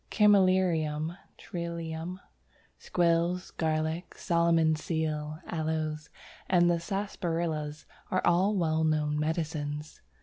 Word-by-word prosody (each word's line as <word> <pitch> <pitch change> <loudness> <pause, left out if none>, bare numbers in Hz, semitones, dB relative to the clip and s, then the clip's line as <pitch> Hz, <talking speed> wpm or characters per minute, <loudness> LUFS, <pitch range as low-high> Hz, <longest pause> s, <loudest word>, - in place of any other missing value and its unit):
Chamælirium, 185 -6 +3 0.2
Trillium, 170 -1 -5 0.6
Squills, 175 +1 +1
Garlic, 160 +2 -2
Solomon's 165 -2 +2
Seal, 155 -2 -2
Aloes, 155 -2 -2 0.4
and 175 -1 +5
the 170 - +2
Sarsaparillas 165 -5 -3 0.2
are 185 - 0
all 185 +5 +3
well 160 -3 +1
known 150 -1 +1
medicines. 150 -1 -3
165 Hz, 90 wpm, -29 LUFS, 155-175 Hz, 0.6 s, and